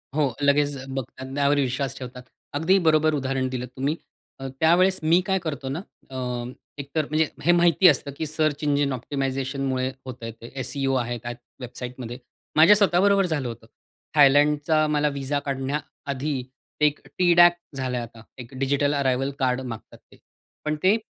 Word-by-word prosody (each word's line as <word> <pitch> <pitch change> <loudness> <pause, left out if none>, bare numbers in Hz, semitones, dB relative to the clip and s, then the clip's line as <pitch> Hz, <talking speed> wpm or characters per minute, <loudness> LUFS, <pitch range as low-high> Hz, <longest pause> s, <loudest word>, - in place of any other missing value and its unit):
हो, 145 -5 +1
लगेच 145 0 +3
अ, 130 - -8
बघतात. 130 0 -6
त्यावर 145 0 +3
विश्वास 135 0 -1
ठेवतात. 125 -1 -8 0.3
अगदी 160 +7 +3
बरोबर 155 0 +4
उदाहरण 135 -2 -1
दिलं 125 -1 -4
तुम्ही. 140 +4 -1 0.4
अ, 135 - -5
त्यावेळेस 185 +4 +4
मी 165 +3 +5
काय 190 -1 +1
करतो 145 -6 -4
ना, 145 +6 -3 0.3
अ, 130 - -10 0.7
एकतर 140 +2 -2
म्हणजे 155 +1 +2 0.2
हे 175 - +5
माहिती 175 +1 +5
असतं 140 -2 +3
की 160 - -2
सर्च 155 -1 -1
इंजिन 145 -1 +1
ऑप्टिमायझेशनमुळे 135 0 -2
होतंय 120 -3 -7
ते 115 - -10
एसईओ 135 0 -1
आहे 120 -1 -1
त्या 120 - -4 0.3
वेबसाईटमध्ये. 125 -1 -7 0.4
माझ्या 160 +7 +8
स्वतःबरोबर 200 0 +4
झालं 155 -7 -2
होतं. 115 -1 -8 0.5
थायलंडचा 150 +2 +4
मला 150 0 +1
विझा 140 +1 -1
काढण्याआधी 140 0 -3 0.4
एक 150 -1 +3 0.2
टी 180 -1 +4
डॅक 175 0 +7 0.2
झालंय 130 -2 -2
आता. 115 -1 -10 0.2
एक 125 0 -10
डिजिटल 140 +1 +1
अराइवल 135 -1 0
कार्ड 130 -1 +1
मागतात 115 -4 -8
ते. - - -18 0.5
पण 155 0 0
ते 195 +4 +5
140 Hz, 155 wpm, -24 LUFS, 130-155 Hz, 0.7 s, माझ्या